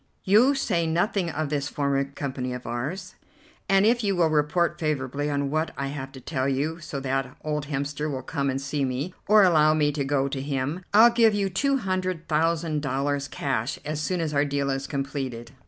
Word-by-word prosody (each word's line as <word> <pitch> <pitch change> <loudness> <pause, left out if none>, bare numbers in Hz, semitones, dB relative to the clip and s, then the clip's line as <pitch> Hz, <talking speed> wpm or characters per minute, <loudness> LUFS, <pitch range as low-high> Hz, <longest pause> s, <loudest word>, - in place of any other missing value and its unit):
You 235 +9 +5
say 170 -11 0
nothing 175 +2 0
of 155 -1 -2
this 145 -1 -1
former 140 -2 0
company 135 -2 -4
of 125 0 -7
ours, 150 - -4 0.6
and 195 +1 +5
if 235 +1 +3
you 200 -2 +1
will 165 -3 +2
report 155 +3 +1
favourably 145 -2 -1
on 140 -1 -1
what 155 +1 0
I 140 0 -2
have 135 -1 -6
to 135 - -9
tell 130 0 -2
you 150 +5 -1
so 155 -4 -5
that 135 -1 -2
old 150 -1 -2
Hemster 145 +1 -2
will 130 -3 -4
come 140 -2 -2
and 135 0 -1
see 140 +1 -2
me, 135 +7 -2
or 210 0 +7
allow 155 -4 +5
me 150 -1 +2
to 145 -1 -2
go 135 0 +1
to 135 -1 -3
him, 140 +5 -2
I'll 225 +3 +7
give 230 -2 +4
you 200 -2 0
two 275 +9 +1
hundred 185 -6 -2
thousand 160 0 +1
dollars 140 +1 -1
cash 135 -4 -2
as 155 0 -3
soon 180 +2 -1
as 155 -2 -2
our 145 0 +3
deal 140 -1 -1
is 135 0 -3
completed." 135 -4 -4
150 Hz, 205 wpm, -25 LUFS, 135-170 Hz, 0.6 s, or